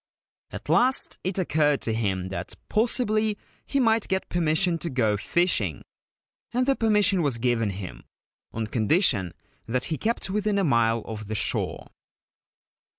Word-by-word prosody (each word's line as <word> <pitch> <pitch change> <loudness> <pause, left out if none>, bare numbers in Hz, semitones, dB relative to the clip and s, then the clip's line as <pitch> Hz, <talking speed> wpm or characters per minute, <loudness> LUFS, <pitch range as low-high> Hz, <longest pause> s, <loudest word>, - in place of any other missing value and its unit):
At - - -9
last 260 +2 +2
it 190 +1 -2
occurred 150 -5 +2
to 115 - -1
him 95 -5 -1
that 95 - -5
possibly 215 -2 +1 0.3
he 275 - 0
might 225 -3 +2
get 190 0 -2
permission 170 +1 +1
to 170 - -3
go 115 -6 +1
fishing; 105 - 0 0.7
and 250 +1 +1
the 275 0 +2
permission 210 -5 +3
was 140 -6 0
given 115 -2 0
him, 95 -2 -7 0.5
on 110 0 -3
condition 110 - +2 0.4
that 125 +2 -1
he - - -3
kept 225 -3 -1
within 210 0 0
a 200 - +2
mile 115 - +2
of 110 -2 -7
the 110 - -3
shore. 105 - -1
155 Hz, 150 wpm, -25 LUFS, -, 0.7 s, permission